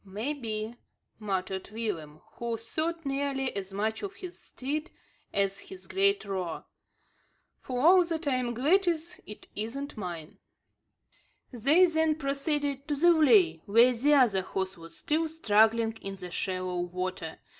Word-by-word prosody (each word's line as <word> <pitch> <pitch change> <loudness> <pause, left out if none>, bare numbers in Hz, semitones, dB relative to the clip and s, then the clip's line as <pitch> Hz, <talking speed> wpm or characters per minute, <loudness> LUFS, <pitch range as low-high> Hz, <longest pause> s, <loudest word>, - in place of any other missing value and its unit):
"May 210 +9 -3
be," 225 -3 -5 0.4
muttered 190 -2 -3
Willem, 170 -9 -5 0.2
who 235 -1 -2
thought 315 +8 -3
nearly 275 -2 -1
as 195 -1 -5
much 215 +3 -2
of 405 -1 -5
his 365 -1 -8
steed 300 +5 -4 0.4
as 195 0 0
his 380 -1 -11
great 395 - +2
roer. 185 -4 -4 0.9
"For 250 -1 -4
all 355 +6 +7
that 330 -2 -3
I'm 250 -3 0
glad 350 - +3
it 335 - -4
isn't 260 +7 -4
mine." 170 -6 -7 1.1
They 285 +10 +5
then 320 -2 +2
proceeded 280 -1 -2
to 295 - 0
the 340 +5 +4
vley, 210 - +5
where 235 +5 +6
the 285 +5 +3
other 230 -9 +4
horse 190 +1 -3
was 165 0 -11
still 320 +1 0
struggling 225 -6 +3
in 195 0 -5
the 180 -2 -9
shallow 185 -1 -2
water. 180 -2 -4
235 Hz, 140 wpm, -29 LUFS, 195-305 Hz, 1.1 s, all